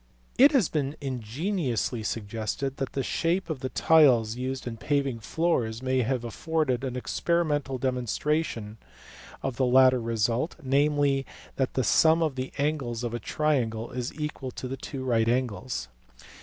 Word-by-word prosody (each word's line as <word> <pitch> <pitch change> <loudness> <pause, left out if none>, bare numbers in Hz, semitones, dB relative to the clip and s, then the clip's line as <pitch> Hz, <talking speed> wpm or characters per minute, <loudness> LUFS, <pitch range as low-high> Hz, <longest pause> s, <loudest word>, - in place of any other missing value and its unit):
It 280 +3 +8
has 245 - +4
been 145 -1 -2
ingeniously 130 - -2
suggested 110 +5 -3
that 135 - -3
the 135 - -1
shape 170 +6 0
of 150 - -4
the 130 - -3
tiles 125 -10 +4
used 130 +1 -4
in 120 -2 -5
paving 140 -1 0
floors 120 -4 -1
may 130 0 +2
have 125 0 -1
afforded 135 +1 -1
an 130 -2 -3
experimental 145 0 0
demonstration 125 -2 -1 0.6
of 135 -3 -3
the 130 - +2
latter 130 0 +5
result, 115 +6 0
namely, 140 0 +2 0.3
that 130 -1 -1
the 130 - +2
sum 160 +7 +4
of 155 -3 0
the 130 0 -4
angles 140 -5 -1
of 120 -1 -3
a 120 - -2
triangle 120 -4 -1
is 125 -1 -3
equal 150 -3 -4
to 130 +1 -5
two 135 0 -6
right 115 -3 +2
angles. 125 -1 -1
130 Hz, 150 wpm, -27 LUFS, 120-145 Hz, 0.6 s, It